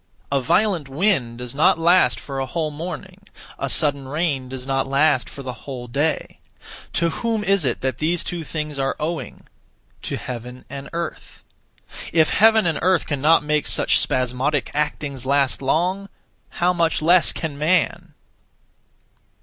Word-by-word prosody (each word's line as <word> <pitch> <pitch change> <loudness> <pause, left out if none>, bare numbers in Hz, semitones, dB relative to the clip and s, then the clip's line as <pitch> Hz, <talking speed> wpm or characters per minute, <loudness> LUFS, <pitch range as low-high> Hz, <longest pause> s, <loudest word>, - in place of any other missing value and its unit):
A 140 -1 +2
violent 175 0 +1
wind 135 - 0
does 125 -1 -7
not 145 +4 +4
last 165 - +4
for 135 -1 -6
a 135 - -2
whole 155 +3 -2
morning; 180 +5 -7 0.4
a - - -2
sudden 140 -4 +1
rain 140 -3 -1
does 130 -1 -6
not 135 0 -1
last 140 -1 +2
for 140 - -9
the 130 -1 -5
whole 125 0 -8
day. 145 +6 -2 0.5
To 170 0 +1
whom 225 -2 0
is 195 -6 +2
it 120 - -1
that 130 0 -2
these 165 +2 0
(two) 175 -2 -4
things 150 -2 -4
are 135 0 0
owing? 160 +2 -4 0.6
To - - -4
Heaven 125 +1 -8
and 140 -1 -7
Earth. 170 -1 -6 0.7
If 160 -1 +3
Heaven 220 -1 +5
and 165 -2 +1
Earth 185 -1 +2
cannot 150 +3 +3
make 150 0 0
such - - +3
(spasmodic) 130 +2 0
actings 145 -3 -3
last 140 -2 +2
long, 180 +8 0 0.4
how 180 +1 +1
much 165 -3 +1
less 175 +2 +6
can 160 -3 -4
man! 160 +3 0
150 Hz, 155 wpm, -22 LUFS, 135-170 Hz, 0.7 s, less